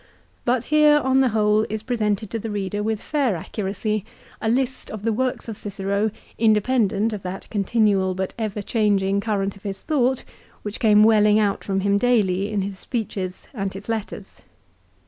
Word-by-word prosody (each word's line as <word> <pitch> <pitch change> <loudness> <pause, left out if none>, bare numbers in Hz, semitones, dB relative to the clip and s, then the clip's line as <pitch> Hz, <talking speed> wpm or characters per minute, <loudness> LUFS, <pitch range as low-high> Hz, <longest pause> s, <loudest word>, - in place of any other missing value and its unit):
But 245 -1 +2
here, 300 -1 +6
on 265 -2 +2
the 265 -1 +4
whole, 215 -1 +3
is 215 +1 -4
presented 215 -3 -1
to 230 - -2
the 225 - -5
reader 205 0 -2
with 220 0 -1
fair 275 -8 0
accuracy 205 +3 -3 0.4
a 220 - 0
list 260 +2 -1
of 215 -2 -7
the 225 0 +1
works 255 +2 -1
of 220 -3 -5
Cicero 200 +1 -1 0.3
independent 220 -1 +2
of 205 - -5
that 185 +1 -6
continual 200 -2 +2
but 190 0 -3
ever 210 -2 -3
changing 200 -3 +1
current 200 -2 -1
of 195 - -16
his 195 -2 -6
thought 265 -4 +1 0.4
which 210 0 -5
came 210 -2 +5
welling 210 -1 +5
out 205 -2 +1
from 195 -1 -1
him 200 +1 +2
daily 205 -4 +2
in 205 -2 0
his 195 -1 -5
speeches 200 -6 -4
and 195 -5 -3
his 195 +1 -9
letters. 225 -2 -5
210 Hz, 175 wpm, -23 LUFS, 200-225 Hz, 0.4 s, here